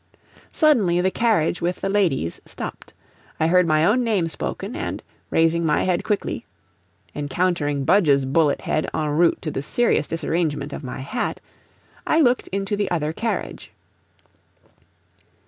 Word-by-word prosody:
Suddenly 220 - +3
the 190 +1 +1
carriage 195 -8 +1
with 175 +1 -2
the - - -1
ladies 180 - 0
stopped. - - -8 0.5
I 160 - +2
heard 180 +1 +4
my 155 0 +3
own 245 +7 +3
name 205 -8 +1
spoken, - - -5
and - - -4 0.3
raising 165 +1 +2
my 155 -2 +2
head 180 0 0
quickly 210 -1 -2 0.7
(encountering 145 -1 -1
Budge's 145 -7 +4
bullet 145 +2 +2
head 155 - -1
EN - - -1
ROUTE 165 +3 +3
to 155 - -3
the 135 - -3
serious 155 0 +1
disarrangement 155 -3 -2
of - - -6
my 130 0 -6
hat), 240 - -3 0.7
I 315 - +3
looked 250 -5 +3
into 195 +1 -2
the 205 -1 -1
other 155 -3 -1
carriage. 225 +5 -4
170 Hz, 145 wpm, -22 LUFS, 150-200 Hz, 0.7 s, heard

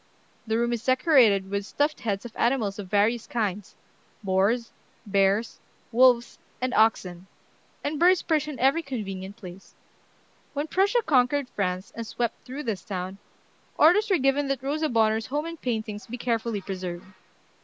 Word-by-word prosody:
The 220 0 +1
room 235 +1 +1
is 235 -1 -3
decorated 250 - +4
with 200 0 -1
stuffed 290 +8 -1
heads 205 -1 -3
of 235 - -9
animals 230 -5 0
of 200 - -6
various 215 +3 +1
kinds, 210 -3 -3 0.5
boars, 200 +5 +1 0.3
bears, 200 +2 +1 0.3
wolves, 245 0 +4 0.2
and 255 0 -2
oxen; 190 -5 +1 0.6
and 290 0 -2
birds 360 +1 +4
perch 310 -3 +1
in 295 -3 -6
every 270 +6 +3
convenient 200 - -6
place." 185 -2 -12 0.8
When 290 +1 -2
Prussia 400 +8 +2
conquered 265 -1 +2
France, 185 -3 -3
and 230 -1 -6
swept 235 0 -3
through 270 +4 -6
this 215 -7 -3
town, 190 0 -5 0.6
orders 420 +8 +5
were 380 - +4
given 275 0 +1
that 270 -2 -2
Rosa 305 +3 -1
Bonheur's 220 -1 +2
home 295 +4 -2
and 335 -1 -7
paintings 220 -4 -3
be 245 - -6
carefully 230 -3 -1
preserved. 185 -3 -6
230 Hz, 155 wpm, -26 LUFS, 200-275 Hz, 0.8 s, orders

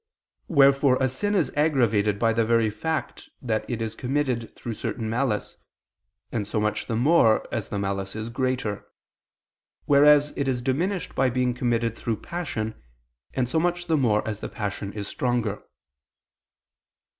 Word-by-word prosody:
Wherefore 140 -3 +5
a 130 - +3
sin 205 +11 -1
is 180 -6 +1
aggravated 115 -9 +2
by 115 +1 +2
the 115 0 +2
very 115 -1 +2
fact 155 +9 -4
that 110 -4 -2
it 115 -2 -2
is 110 -1 -3
committed 125 -2 -2
through 120 - -5
certain 110 +1 -4
malice, 115 -3 -1 0.7
and 105 -4 -2
so 105 - -1
much 105 0 -1
the 115 - -1
more, 120 -2 +4
as 110 -4 -3
the 105 - -3
malice 100 0 -3
is 110 +1 -4
greater; 125 -4 -2 1.0
whereas 145 +1 +5
it 140 - -1
is 125 -2 -1
diminished 165 +7 -1
by 135 -1 +2
being 125 0 0
committed 120 -2 0
through 115 -2 -2
passion, 110 - -4 0.5
and 130 -2 +1
so 160 +6 +1
much 175 +1 0
the 165 -2 +1
more, 110 -8 +2
as 105 -1 -3
the - - -5
passion 100 -2 -4
is 105 -1 -5
stronger. 120 -4 -1
120 Hz, 155 wpm, -25 LUFS, 110-140 Hz, 1.0 s, Wherefore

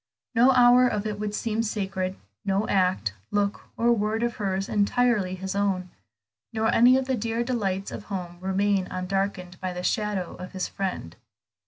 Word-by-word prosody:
No 245 +2 +5
hour 250 0 +6
of 210 -3 -2
it 210 -1 -3
would 210 0 -3
seem 225 0 -1
sacred, 195 -4 -2 0.3
no 195 +2 0
act, 185 - +1 0.2
look, 205 0 -1
or 235 +1 +4
word 220 +1 0
of 235 -1 -1
hers 195 -1 -1
entirely 210 -2 +2
his 190 +1 -4
own, 190 -3 0 0.6
nor 220 0 +1
any 245 +3 +6
of 265 - -1
the 260 0 0
dear 230 +1 -1
delights 200 -6 -2
of 210 - -7
home 180 -3 -5
remain 190 0 +1
undarkened 185 -1 -3
by 185 -1 -2
the 180 0 -5
shadow 205 -3 -1
of 185 - -9
his 190 -1 -2
friend. 185 - -4
200 Hz, 170 wpm, -26 LUFS, 185-225 Hz, 0.6 s, hour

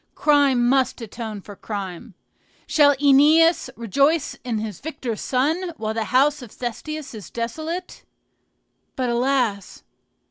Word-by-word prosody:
Crime 280 -5 +3
must 260 0 +2
atone 220 -2 -7
for 205 +1 -11
crime. 195 -1 -7 0.5
Shall 285 -2 +4
OEneus 295 +5 +4
rejoice 275 - +1
in 240 -3 -2
his 210 -4 -5
victor 280 -7 -5
son, 315 - -1
while 220 0 -3
the 225 -1 -2
house 280 +5 +2
of 240 -4 -11
Thestius 285 +5 -6
is 215 -3 -9
desolate? 315 +10 -5 0.9
But, 255 -2 -1
alas! 240 -5 -1
255 Hz, 120 wpm, -22 LUFS, 225-295 Hz, 0.9 s, Shall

